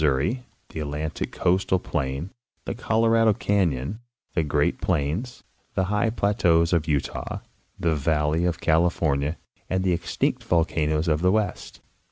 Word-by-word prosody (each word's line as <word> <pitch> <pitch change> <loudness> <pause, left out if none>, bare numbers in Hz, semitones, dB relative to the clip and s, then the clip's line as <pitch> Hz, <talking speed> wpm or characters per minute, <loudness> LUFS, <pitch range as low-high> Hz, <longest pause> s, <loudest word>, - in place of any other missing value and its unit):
227 75 - +1
souri, - - -29 0.3
the - - -4
Atlantic 75 +1 -3
coastal 95 +1 +2
plain, 75 -1 -3 0.3
the - - -2
Colorado 115 0 +3
canyon, 95 - 0 0.3
the 85 - +2
Great 75 -1 0
Plains, 85 - -1 0.3
the 95 - +2
high 105 +2 +2
plateaus 90 -6 +2
of 80 -2 +1
Utah, 75 -3 -2 0.4
the 85 -1 +2
valley 75 +2 +1
of 85 -1 0
California, 80 -3 +1 0.3
and 95 0 0
the 90 -2 +2
extinct 85 -1 -1
volcanoes 80 -1 +1
of 75 -1 +2
the 90 +1 +4
West. 105 -3 -2
85 Hz, 140 wpm, -25 LUFS, 75-95 Hz, 0.4 s, the